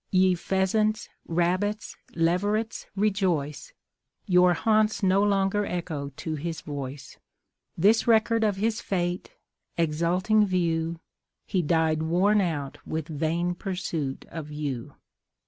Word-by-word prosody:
Ye 185 -1 +4
pheasants, 195 +4 0 0.2
rabbits, 185 +5 0 0.2
leverets 205 +7 0
rejoice, 185 -8 0 0.5
Your 180 -1 +5
haunts 215 +1 +2
no 190 +1 +4
longer 200 0 +2
echo 165 -7 -4
to 160 - -4
his 160 +2 -4
voice; 140 -2 -7 0.6
This 210 +8 +4
record 225 0 +4
of 210 -2 +2
his 220 +3 -1
fate, 175 -1 -2 0.4
exulting 170 +7 +2
view 170 -3 0 0.5
He 190 -4 0
died 160 -1 +1
worn 185 +6 +3
out 150 -7 -3
with 160 -1 -4
vain 165 +3 -1
pursuit 175 -7 -4
of 160 -2 -6
you. 145 -5 -5
180 Hz, 110 wpm, -26 LUFS, 160-205 Hz, 0.6 s, Your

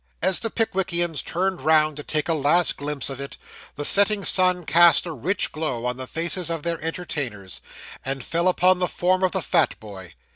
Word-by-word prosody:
As 190 -1 +4
the 225 - -2
Pickwickians 175 - -1
turned 185 0 -3
round 155 +1 +2
to - - -5
take 150 +1 -2
a 165 - +1
last 160 +3 +2
glimpse 145 -2 -4
of 135 -1 -6
it, 140 - -8 0.4
the 145 - -5
setting 200 +2 +5
sun 185 -2 +4
cast 170 +4 +5
a 170 - -5
rich 175 - -1
glow 150 -7 -4
on 125 0 -3
the 130 0 -8
faces 170 +3 -2
of 165 -3 -4
their 170 -1 -3
entertainers, 145 - -5 0.4
and 135 -1 -4
fell 170 +5 -1
upon 185 0 +3
the 180 - 0
form 185 +2 0
of 185 -1 +1
the - - -2
fat - - 0
boy. 95 -6 -11
165 Hz, 195 wpm, -22 LUFS, 140-180 Hz, 0.4 s, setting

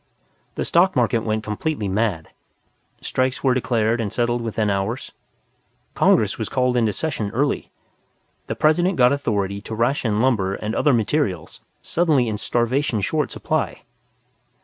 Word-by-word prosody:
The - - -2
Stock 180 +2 +3
Market 120 -2 +2
went 110 0 -2
completely 110 +2 -2
mad. 95 -5 -1 0.7
Strikes 130 +1 -1
were 130 -2 +4
declared 115 -2 +1
and 105 -3 -3
settled 120 0 0
within 110 -2 -1
hours. 100 +5 -2 0.8
Congress - - +2
was - - -3
called 125 -1 +1
into 115 -3 +2
session 120 -6 -3
early. 140 +3 0 0.8
The - - -3
President 175 +5 +2
got 125 +1 +5
authority 100 -7 -1
to 110 - -6
ration 115 -2 0
lumber 110 -6 +1
and 110 +1 -4
other 145 - +3
materials 110 - -1 0.2
suddenly 155 -8 +2
in 105 -2 -3
starvation 120 +2 0
short - - 0
supply. - - -2
120 Hz, 140 wpm, -22 LUFS, 105-130 Hz, 0.8 s, got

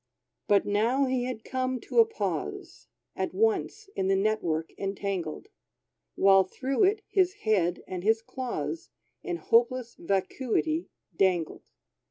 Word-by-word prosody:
But 205 -1 +4
now 230 +7 +2
he 255 -1 0
had 245 -3 -5
come 255 -1 -2
to - - 0
a 455 - +7
pause, 445 - -4 0.3
At - - -3
once 435 0 0
in 190 - 0
the 195 - +3
net 215 +2 +1
work 160 -1 -2
entangled, 195 - -3 0.7
While 195 0 +6
through 265 - 0
it 415 +2 +1
his 370 -2 +2
head 180 -5 +1
and 180 -1 -5
his 225 +2 +2
claws 225 - -4 0.3
In 175 - -3
hopeless 235 +6 +2
vacuity 240 - -1 0.3
dangled. 180 -4 0
220 Hz, 135 wpm, -28 LUFS, 190-260 Hz, 0.7 s, a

